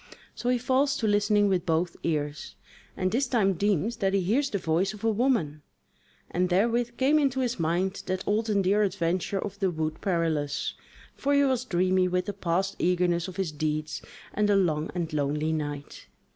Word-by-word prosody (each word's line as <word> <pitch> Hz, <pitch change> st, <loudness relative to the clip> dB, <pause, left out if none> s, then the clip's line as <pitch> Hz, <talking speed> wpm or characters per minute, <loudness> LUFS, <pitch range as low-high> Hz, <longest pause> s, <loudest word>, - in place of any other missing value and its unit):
So 245 Hz, -, -3 dB
he 250 Hz, -, +3 dB
falls 260 Hz, +3 st, +1 dB
to 225 Hz, -, -2 dB
listening 205 Hz, 0 st, +3 dB
with 185 Hz, -3 st, +1 dB
both 170 Hz, +2 st, 0 dB
ears, 150 Hz, -2 st, -3 dB, 0.4 s
and 185 Hz, 0 st, 0 dB
this 260 Hz, +4 st, +1 dB
time 210 Hz, -6 st, +2 dB
deems 205 Hz, +4 st, 0 dB
that 195 Hz, -3 st, +1 dB
he 195 Hz, -, +2 dB
hears 250 Hz, +10 st, +1 dB
the 205 Hz, -, -1 dB
voice 185 Hz, +4 st, 0 dB
of 210 Hz, -, -14 dB
a 225 Hz, -, +3 dB
woman: 210 Hz, -, 0 dB, 0.7 s
and 180 Hz, +1 st, +1 dB
therewith 235 Hz, +5 st, +1 dB
came 285 Hz, +4 st, +4 dB
into 270 Hz, -2 st, +1 dB
his 245 Hz, -5 st, -1 dB
mind 175 Hz, +4 st, 0 dB
that 185 Hz, 0 st, -3 dB
old 220 Hz, +2 st, +1 dB
and 200 Hz, -2 st, +2 dB
dear 200 Hz, +3 st, +3 dB
adventure 185 Hz, -1 st, 0 dB
of 200 Hz, 0 st, -5 dB
the 195 Hz, -3 st, +2 dB
Wood 155 Hz, -2 st, -3 dB
Perilous; 160 Hz, -6 st, -1 dB, 0.4 s
for 285 Hz, +1 st, +1 dB
he 280 Hz, -, +5 dB
was 260 Hz, -2 st, +1 dB
dreamy 185 Hz, -2 st, +2 dB
with 180 Hz, 0 st, 0 dB
the 205 Hz, -, -3 dB
past 190 Hz, 0 st, -1 dB
eagerness 175 Hz, -1 st, +1 dB
of 185 Hz, -, -8 dB
his 190 Hz, -5 st, -2 dB
deeds, 150 Hz, -2 st, -3 dB, 0.3 s
and 210 Hz, 0 st, +1 dB
the 205 Hz, -, +4 dB
long 160 Hz, -5 st, +1 dB
and 170 Hz, -3 st, -3 dB
lonely 150 Hz, +2 st, 0 dB
night. 145 Hz, -2 st, -5 dB
190 Hz, 190 wpm, -27 LUFS, 165-215 Hz, 0.7 s, he